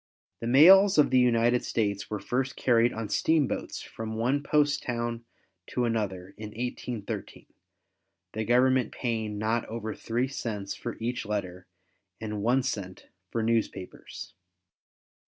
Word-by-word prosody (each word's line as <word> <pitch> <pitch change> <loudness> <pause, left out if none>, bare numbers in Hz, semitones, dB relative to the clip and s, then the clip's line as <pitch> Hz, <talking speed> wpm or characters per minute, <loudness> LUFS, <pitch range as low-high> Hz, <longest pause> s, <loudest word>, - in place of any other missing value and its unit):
The 115 - -4
mails 190 +10 +7
of 150 - +5
the 130 - +5
United 120 0 +3
States 100 -3 -1
were 105 - -2
first 130 +6 -2
carried 120 -1 +3
on 110 -1 -4
steamboats 150 +7 0
from 110 0 -6
one 125 +6 +1
post 145 0 +2
town 120 -1 -3 0.4
to 125 - -1
another 100 -5 -2
in 110 - -5
1813, 120 -1 -5 0.9
the 110 - -2
Government 125 +1 +3
paying 110 -4 -3
not 110 +2 0
over 110 -1 -5
3 120 +3 -2
cents 105 -7 -4
for 120 - -6
each 120 +2 -2
letter 95 -4 -4 0.5
and 105 -2 -4
1 125 +5 +2
cent 95 -8 -5 0.2
for 115 - -2
newspapers. 110 -5 -3
115 Hz, 135 wpm, -28 LUFS, 110-125 Hz, 0.9 s, mails